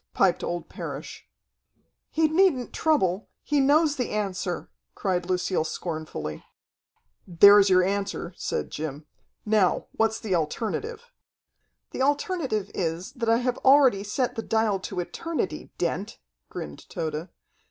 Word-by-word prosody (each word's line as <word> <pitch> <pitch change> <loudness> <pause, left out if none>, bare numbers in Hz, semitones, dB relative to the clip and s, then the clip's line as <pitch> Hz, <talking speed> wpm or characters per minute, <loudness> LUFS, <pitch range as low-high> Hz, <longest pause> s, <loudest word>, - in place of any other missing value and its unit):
piped 185 -3 +3
old 175 0 -3
Parrish. - - -7 0.8
"He 320 0 +2
needn't 315 -6 +2
trouble. 205 - +1
He 295 -1 +1
knows 295 +2 +4
the 250 - -1
answer!" 195 -4 -3 0.2
cried 180 -2 -1
Lucille 185 -2 0
scornfully. 155 - -5 0.8
"There's 200 +3 +7
your 185 -1 +5
answer," 195 -2 -2
said - - -3
Jim. 150 -1 -5 0.4
"Now, 210 -4 +2
what's 225 0 0
the 215 -4 -2
alternative?" 420 - -2 0.8
"The - - -4
alternative 280 - 0
is, 170 0 -3
that 230 -3 -2
I 230 - +5
have 250 -1 0
already 265 -7 +5
set 240 +5 -1
the 225 - -3
dial 220 -3 +1
to 190 0 -5
eternity, 315 - -3
Dent," 175 +3 -2 0.3
grinned 75 -1 -8
Tode. 160 0 -4
200 Hz, 125 wpm, -26 LUFS, 175-260 Hz, 0.8 s, There's